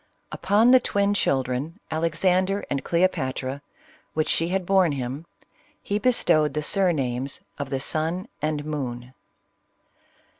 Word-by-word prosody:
Upon 220 +5 +3
the 255 - +8
twin 200 -3 +1
children, 135 +1 -1
Alexander 185 +5 +1
and 140 -1 -1
Cleopatra, 140 -6 0 0.5
which 155 0 0
she 165 - +2
had 185 +1 -1
borne 185 -4 +3
him, 135 +4 -5 0.5
he 205 +1 -2
bestowed 155 -12 +2
the 150 - -1
surnames 140 -8 0 0.2
of 140 -1 -4
the 135 -1 -1
Suit 160 - -1
and 150 -1 -2
Moon. 125 -5 -5
155 Hz, 120 wpm, -24 LUFS, 135-190 Hz, 0.5 s, the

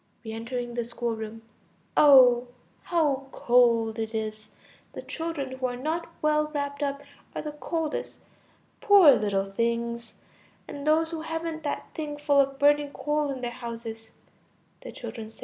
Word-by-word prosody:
(Re 220 - -5
entering 240 +2 -4
the 235 0 -1
schoolroom.) 225 -1 -5 0.5
Oh! 255 -4 +7 0.4
how 290 -6 +1
cold 230 -2 +3
it 220 0 -3
is! 215 -1 -4 0.4
The - - -7
children 320 -5 -4
who 255 - 0
are 245 - -4
not 320 +6 -3
well 305 0 +2
wrapped 285 0 -3
up 280 0 -2 0.3
are - - -2
the 300 - -4
coldest. 310 +1 -4 0.6
Poor 395 -8 +8
little 205 -5 +1
things! 235 +3 -2 0.5
And 285 +1 -7
those 320 +1 +3
who 325 -1 -4
haven't 325 0 -4
that 290 - -3
thing 300 -2 -5
full 290 -1 +2
of 275 0 +2
burning 290 +1 +3
coal 295 0 -1
in 265 -2 -4
their 240 -1 -3
houses! 230 -2 -7 0.8
Children. 220 -2 -8
265 Hz, 145 wpm, -27 LUFS, 230-300 Hz, 0.8 s, Poor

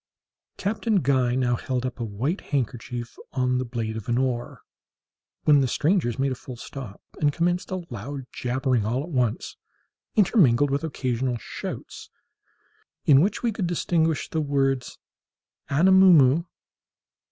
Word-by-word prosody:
Captain 215 +2 -1
Guy 130 -2 +2
now 125 -2 +1
held 125 +1 -3
up 130 0 -5
a - - -2
white 115 - -2
handkerchief 120 -3 -4 0.2
on 125 -1 +1
the - - -1
blade 115 -2 -4
of 110 -1 -6
an 120 - +2
oar, 125 -2 -2 0.8
when 145 -2 +5
the 130 - +2
strangers 150 - +1
made 135 0 0
a - - 0
full 125 0 -9
stop, 120 -3 -9 0.2
and 145 -1 +3
commenced 175 +3 -1
a 185 -2 -4
loud 130 +5 -6
jabbering 125 -2 0
all 120 +6 -1
at 170 - -8
once, 125 -6 -1 0.6
intermingled 145 - +4
with 140 +2 0
occasional 130 -5 -1
shouts, - - -7 1.0
in 140 -2 +6
which 205 +7 0
we 235 - +2
could 195 -4 -2
distinguish 165 -2 0
the 160 - -2
words 135 -3 0 0.7
Anamoo 190 +5 +6
moo! 145 +1 +5
135 Hz, 145 wpm, -25 LUFS, 120-160 Hz, 1.0 s, in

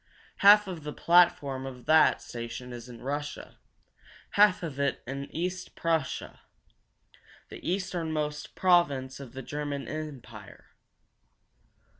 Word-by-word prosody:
Half 205 +1 +7
of 180 -4 -6
the 150 0 -5
platform 170 -7 +3
of 125 -2 -10
that 155 0 +5
station 120 +1 -7
is 120 0 -9
in 120 -2 -11
Russia; 145 +2 -5 0.7
half 205 -3 +4
of 145 -5 -5
it 140 -1 0
in 140 +2 -5
East 180 +2 -4
Prussia, 160 -5 -2 1.1
the - - -10
easternmost 160 -5 -3
province 145 -8 +2
of 135 -4 -10
the 135 0 -7
German 145 0 -4
empire. 130 -9 -8
150 Hz, 115 wpm, -28 LUFS, 130-170 Hz, 1.1 s, Half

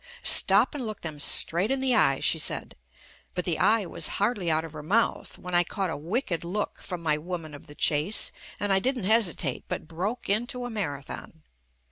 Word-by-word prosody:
"Stop 200 +6 +5
and 290 -3 -4
look 215 -3 -5
them 155 -3 -5
straight 170 +6 +4
in 270 0 0
the 260 -1 +2
eye," 135 - +3
she - - +2
said, - - -2 0.6
but 180 -1 -2
the 170 -3 0
"eye" 220 -2 +3
was - - +1
hardly 205 -4 0
out 160 0 +1
of 160 - -11
her 150 - -7
mouth 210 +10 0
when 180 0 -8
I 175 0 +5
caught 190 0 -3
a - - -3
wicked 170 - -2
look 195 +5 -3
from 180 -3 -6
my 150 -2 +2
woman 165 -2 -6
of 145 +3 -12
the 145 - -13
chase, 155 +9 +3 0.3
and 205 -1 +1
I 190 - +4
didn't 255 +1 -1
hesi 215 -2 +3
tate, 135 -5 -4
but - - -5
broke 190 +9 -4
into 240 +5 -1
a 245 - -5
marathon. 155 -4 -6
180 Hz, 205 wpm, -27 LUFS, 160-220 Hz, 0.6 s, Stop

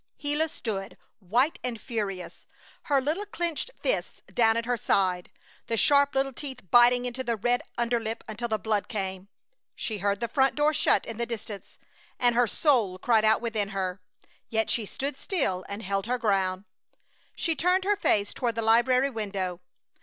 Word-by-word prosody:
Gila 300 +2 0
stood, 195 -8 -5 0.2
white 240 - +1
and 245 -3 -3
furious, 200 -6 -5 0.4
her 280 -2 +3
little 315 +10 -2
clenched 345 - -2
fists - - -1
down 225 -1 +4
at 230 - -1
her 245 +1 +1
sides, 185 -5 +1 0.4
the 230 - -1
sharp 285 +3 +4
little 270 0 +1
teeth 265 0 -7
biting 245 +1 +6
into 250 +1 -3
the 235 -2 0
red 245 +3 +1 0.2
underlip 235 -1 -1
until 225 +2 -4
the 220 -1 0
blood 215 -2 -1
came. 190 -4 -4 0.5
She 215 -3 -3
heard 200 0 0
the 235 - -1
front 265 +3 +2
door 295 +1 +3
shut - - +3
in 225 - -6
the 235 0 -2
distance, 215 -3 -7 0.4
and 245 -1 +3
her 240 0 +3
soul 225 - +2
cried 220 +2 +3
out 220 0 +4
within 220 -4 -1
her, 190 -2 -3 0.5
yet 220 -1 0
she 220 -3 0
stood 275 +5 -4
still 230 - -1
and 200 +2 -5
held 195 +1 -2
her 250 +1 +1
ground. 195 -4 0 0.7
She 330 -2 0
turned 360 +5 +2
her 410 +2 +2
face 205 - +1
toward 240 -3 -1
the 230 - -1
library 250 +4 +4
window. 195 -5 -3
230 Hz, 175 wpm, -27 LUFS, 205-265 Hz, 0.7 s, biting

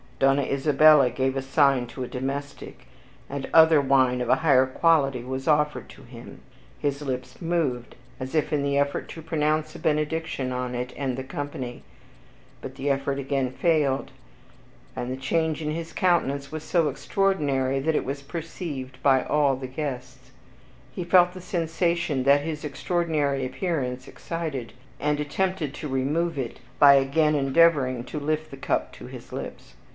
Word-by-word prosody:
Donna 135 +1 +3
Isabella 140 0 +5
gave 130 +2 -1
a 135 - -1
sign 135 -2 +2
to 130 +2 -6
a - - -5
domestic, 140 +3 -6 0.4
and 140 -1 -5
other 160 -2 +7
wine 130 -2 +3
of 125 - -2
a - - +5
higher 135 -5 +4
quality 135 -3 +2
was 130 +1 -5
offered 150 -1 +1
to 140 - -14
him. 120 -1 -12 0.4
His 145 -1 -2
lips 130 0 -5
moved, 160 -8 -1 0.2
as 130 +3 -5
if 155 0 +1
in 145 - +1
the 140 0 0
effort 140 0 -1
to 165 - -8
pronounce 155 0 0
a - - -8
benediction 155 -3 -1
on 125 0 -3
it 125 +1 -4
and 130 -3 -2
the 130 - -4
company, 130 - -6 0.8
but - - -8
the 140 +2 -2
effort 140 0 0
again 135 -2 -1
failed; 145 -2 +1 0.8
and 125 - -4
the 130 - -3
change 160 +4 -1
in 150 -1 -2
his 165 +1 -5
countenance 140 -6 +1
was 155 -1 -5
so 165 -1 +1
extraordinary, 140 -4 0
that 155 +3 0
it - - 0
was 140 +1 -4
perceived 145 -4 -6
by 135 -2 +4
all 145 -2 +2
the 130 0 -6
guests. 130 -1 -6 0.6
He 180 - -5
felt 180 0 +4
the 185 - -9
sensation 170 -5 -1
that 140 +2 +5
his 155 0 -5
extraordinary 150 -2 -1
appearance 130 -4 -3
excited, 155 -9 -5 0.3
and 150 0 0
attempted 155 0 -2
to 150 - -6
remove 145 +5 -1
it 125 -4 -4 0.2
by 140 -1 +8
again 140 +3 +2
endeavoring 135 -3 +3
to 150 - -5
lift 155 +1 -2
the 135 - -8
cup - - -1
to - - -11
his - - -11
lips. - - -8
140 Hz, 165 wpm, -25 LUFS, 130-160 Hz, 0.8 s, by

